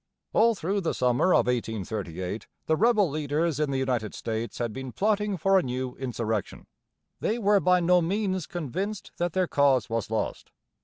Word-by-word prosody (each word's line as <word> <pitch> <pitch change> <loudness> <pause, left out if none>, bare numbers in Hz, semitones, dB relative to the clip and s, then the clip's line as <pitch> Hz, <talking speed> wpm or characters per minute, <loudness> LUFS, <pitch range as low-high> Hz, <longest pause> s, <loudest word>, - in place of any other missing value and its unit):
All 230 +1 +4
through 195 +3 -1
the 170 - -1
summer 125 +8 +2
of - - +4
1838 105 -5 -3 0.2
the 160 - +2
rebel 215 +1 +4
leaders 150 +1 -1
in 150 -2 +1
the 135 - -1
United 125 -5 -1
States 115 +1 -4
had 120 -3 -2
been 130 +1 -6
plotting 210 - 0
for 195 +3 +4
a - - +1
new 130 -1 -3
insurrection. 115 -5 -3 0.5
They 220 - 0
were 205 -3 +4
by 180 -1 +3
no 180 +1 +4
means 190 0 -1
convinced 190 - -4
that 175 -1 -1
their 185 -1 +2
cause 135 -8 +2
was 115 -2 -1
lost. 110 0 -3
150 Hz, 170 wpm, -27 LUFS, 120-190 Hz, 0.5 s, All